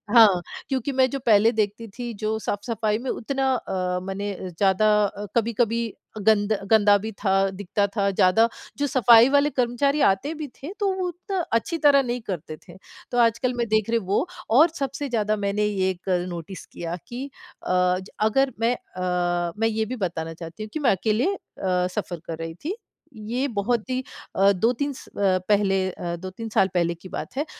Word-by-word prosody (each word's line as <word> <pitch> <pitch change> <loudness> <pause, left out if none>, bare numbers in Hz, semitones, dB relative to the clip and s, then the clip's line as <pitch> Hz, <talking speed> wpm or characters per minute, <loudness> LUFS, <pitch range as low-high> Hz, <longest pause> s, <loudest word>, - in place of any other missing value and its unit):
हाँ। 205 -6 +7 0.3
क्योंकि 270 0 -1
मैं 260 0 +3
जो 275 - -3
पहले 220 0 +5
देखती 215 0 -2
थी 240 -1 -4
जो 215 0 0
साफ़-सफ़ाई 215 0 -1
में 250 +3 -5
उतना 265 +2 -1
अ, 180 -5 -2
माने 195 +2 -3
अ, 185 - -7
ज़्यादा 190 +4 +2 0.2
अ, 205 +1 -5
कभी-कभी 230 0 +1 0.5
गंद 215 -1 +4 0.2
गंदा 205 -2 +6
भी 220 +2 -5
था, 195 -1 +1
दिखता 200 +1 -1
था 200 -2 +2
ज़्यादा, 195 +4 +4 0.3
जो 285 - 0
सफ़ाई 240 -2 +6
वाले 285 +1 +4
कर्मचारी 275 +3 +1
आते 195 +11 +2
भी 305 -1 -5
थे 290 +6 -6
तो 400 -2 +1
वो 365 - 0
उतना 360 +2 -4
अच्छी 280 +9 0
तरह 285 -2 +6
नहीं 245 -1 -3
करते 165 -4 -5
थे। - - -12 0.4
तो 245 - -1
आजकल 235 +2 +2
मैं 235 -1 0
देख 215 0 +1
रही 230 0 +2
वो 205 - +1 0.3
और 320 +5 +7
सबसे 275 +1 -3
ज़्यादा 215 -3 +1
मैंने 205 +1 +1
ये 190 -2 0
कल 180 -2 0
नोटिस 175 +1 -7
किया 170 0 -6
कि 245 +3 -5 0.4
अ 180 0 +2
ज 190 - -11
अगर 260 +5 +2
मैं 230 +2 +2
अ, 175 -3 -2
मैं 225 - +3
ये 220 0 0
भी 255 - -4
बताना 170 -6 -3
चाहती 165 +4 -8
हूँ 215 - -8
कि 310 - -2
मैं 275 -5 +3
अकेले 215 - +1
अ, - - -9 0.6
सफ़र 180 -5 -3
कर 165 - -4
रही 165 0 -5
थी। 365 +6 -1 0.4
ये 235 +5 -2
बहुत 230 0 -1
ही 255 0 -1 0.3
अ, 195 +1 +5
2-3 235 +9 0
स - - -12
अ, 190 -2 +1
पहले 195 -2 +2
अ, 175 -1 -4
2-3 190 +6 -7
साल 195 -3 +3
पहले 170 -1 +1
की 180 +3 -13
बात - - -6
है। 290 - 0
215 Hz, 190 wpm, -24 LUFS, 190-245 Hz, 0.6 s, हाँ